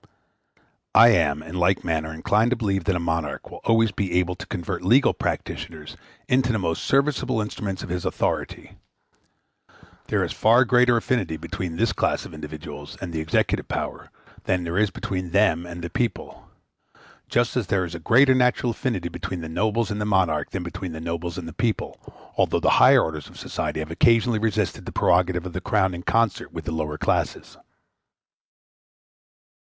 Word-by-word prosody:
I 115 - +9
am, 75 -8 +2
in 80 +3 -6
like 90 +2 +2
manner, 80 -2 -1
inclined 105 +8 +1
to 130 - +1
believe 95 -5 -1
that 95 - +1
a - - 0
monarch 80 -3 -3
will - - -10
always 115 0 +3
be 95 -2 -3
able 90 0 +1
to 90 - -9
convert 90 -2 -4
legal 120 +9 +4
practitioners - - -5 0.3
into 125 -1 +2
the 110 - 0
most 85 -5 -2
serviceable 140 -3 +1
instruments 105 -3 -4
of - - -7
his 90 0 -3
authority. - - -3 1.3
There - - +1
is - - -3
a - - -6
far 120 +4 +5
greater 125 0 +4
affinity 115 -8 -1
between 85 +1 -5
this 110 +5 +1
class - - 0
of - - -10
individuals 75 -1 -8
and 90 -3 -6
the 80 - -2
executive 80 0 0
power - - -4 0.4
than 90 -2 0
there 85 0 -4
is 105 -1 +3
between 90 -1 -4
them 90 -3 +2
and 85 0 -8
the 85 - -4
people; 120 +5 -3 0.8
just 120 0 +1
as 120 -7 -1
there 95 -1 +1
is 85 - -8
a 85 - -5
greater 130 +10 +5
natural 125 -1 +2
affinity 110 -6 -2
between 90 0 -5
the 80 - -6
nobles 110 +5 0
and 105 0 -3
the - - -1
monarch 90 -7 +1
than 95 - -4
between 90 0 -6
the 80 - -6
nobles 85 +1 -4
and 85 -3 -6
the 80 - -8
people, 115 +4 -2 0.4
although - - +2
the - - +2
higher - - +7
orders 75 -2 -4
of - - -15
society - - -3
have 80 +1 -6
occasionally 115 +5 +3
resisted 110 -1 -1
the - - -4
prerogative 90 0 +2
of 90 - -6
the - - -4
Crown 95 -1 +1
in 85 - -6
concert 115 +2 0
with - - -7
the - - -3
lower 75 -1 -3
classes. - - -1
90 Hz, 185 wpm, -24 LUFS, 85-115 Hz, 1.3 s, I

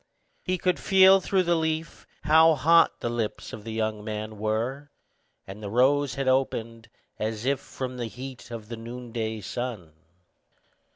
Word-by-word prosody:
He 185 0 -1
could 180 +1 0
feel 190 0 +6
through 190 0 +1
the 175 0 +2
leaf 160 -1 -2 0.2
how 160 +2 +6
hot 165 +4 +4
the 120 - -1
lips 115 -3 -4
of 105 - -8
the 115 - -6
young 110 -1 -2
man 110 0 -5
were, 115 +7 -2 0.6
and 100 +2 -9
the 100 - -5
rose 135 +4 +2
had 135 -1 -2
opened, 115 -3 -1 0.3
as 110 +1 -3
if 140 0 +1
from 130 -1 -6
the 120 -2 -3
heat 125 +2 -9
of 115 -3 -7
the 115 0 -6
noonday 115 -2 -5
sun. 105 -6 -5
125 Hz, 160 wpm, -26 LUFS, 110-145 Hz, 0.6 s, feel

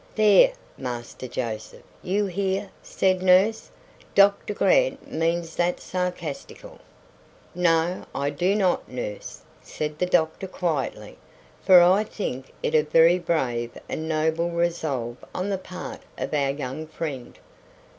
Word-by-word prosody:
"There, 215 - +6 0.3
Master 125 0 -6
Joseph, 115 -3 -5 0.2
you 200 +3 0
hear," 195 +1 -2
said 185 -1 0
nurse. 190 +4 +4 0.5
"Doctor 200 +1 +4
Grant - - +2
means 165 +1 -1
that 175 +1 +1
sarcastical." 180 - -5 0.7
"No, 175 0 +1
I 140 +1 -1
do 180 +7 +1
not, 190 -4 +1
nurse," 115 -5 -6 0.2
said 150 0 -5
the 180 - +1
doctor 170 +2 +1
quietly; 165 -7 -3 0.4
"for 180 -2 +8
I 190 +4 +5
think 135 - -5
it - - -1
a 155 - +6
very 165 +3 +4
brave 125 -9 -1
and 160 +1 -4
noble 160 +2 +1
resolve 160 -8 -2 0.2
on 185 +2 -2
the 195 -2 -1
part 185 -1 -8 0.2
of - - -4
our 140 -2 +1
young 140 +2 -4
friend." 145 -6 -6
170 Hz, 125 wpm, -25 LUFS, 145-185 Hz, 0.7 s, for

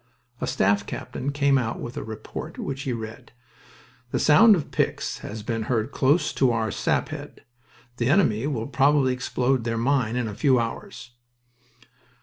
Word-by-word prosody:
A - - -1
staff 100 +1 +1
captain 140 +2 -4
came 140 -1 +3
out 115 -3 -3
with 120 - -6
a - - -4
report, 110 +8 -7
which 135 0 -4
he 135 -3 -3
read: 110 -1 -7 0.8
"The - - -1
sound 210 +8 +7
of 155 -5 -4
picks - - -1
has 105 0 -7
been 115 0 -2
heard 115 -3 0
close 155 +4 +2
to 130 - +3
our 110 -2 -1
sap - - 0
head. - - -9 0.5
The 120 +1 0
enemy 140 - +3
will 120 -7 -2
probably 140 -1 +3
explode 125 0 0
their 115 0 -2
mine 120 -1 +1
in 125 -2 -1
a 105 - -5
few 130 +3 +3
hours." 120 - -5
125 Hz, 165 wpm, -25 LUFS, 115-140 Hz, 0.8 s, sound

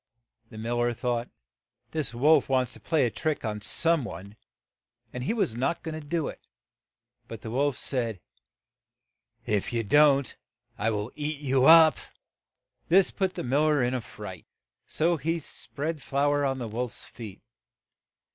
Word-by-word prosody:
The 110 - -11
mil 115 +2 -2
ler 120 0 +1
thought, 120 0 -2 0.6
"The 155 -5 0
wolf 150 +6 +4
wants 130 -2 +1
to - - -9
play 150 +5 +1
a 120 - -1
trick 155 +4 -2
on 105 -1 -3
some 165 +7 +1
one, 100 -1 -8 0.3
' - - -66
' 120 -1 -44
and 125 0 -4
he - - 0
was 205 - 0
not 135 +7 -1
go 160 - -4
ing 155 0 -6
to 145 - -14
do 165 -1 -1
it; - - -8 0.9
but 115 - -8
the 110 - -6
wolf 140 +2 +1
said, 115 -9 -2 1.3
"If 105 +2 -1
you 115 -1 -1
don't, 140 +4 +4 0.4
I 110 - 0
will 105 +2 -3
eat 150 0 -4
you 135 -2 +2
up." 160 -2 +8 0.9
This 185 +2 +5
put 190 -2 -1
the - - -4
mil 140 +5 +2
ler 150 -4 +3
in 120 +1 0
a 130 - -1
fright, - - -10 0.4
so 170 +2 +1
he 165 +4 -1
spread 150 0 -6
flour 145 +1 +1
on 135 -1 0
the 120 -3 -4
wolf's 120 +2 -5
feet. 105 -5 -10
135 Hz, 175 wpm, -27 LUFS, 115-155 Hz, 1.3 s, up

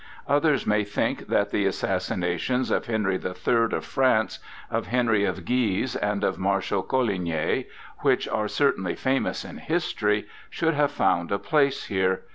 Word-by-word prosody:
Others 145 -1 +2
may 105 0 +2
think 100 0 -2
that 100 0 +1
the 100 -1 +1
assassinations 95 +6 -1
of - - 0
Henry 105 -5 0
the 90 - -5
Third 115 +5 +1
of - - -2
France, 130 -5 +1 0.3
of - - -1
Henry 115 -4 +2
of 95 -2 -3
Guise, 120 -1 0
and 105 0 -1
of - - 0
Marshal 95 0 0
Coligny, 90 -11 0 0.3
which - - +2
are 105 -1 -1
certainly 95 -10 +1
famous 135 +1 -1
in - - -9
history, 105 -11 0 0.2
should 165 -1 0
have 145 -1 +2
found 85 -11 +1
a 100 - +2
place 140 +2 +1
here. 95 -2 0
105 Hz, 155 wpm, -25 LUFS, 95-130 Hz, 0.3 s, Others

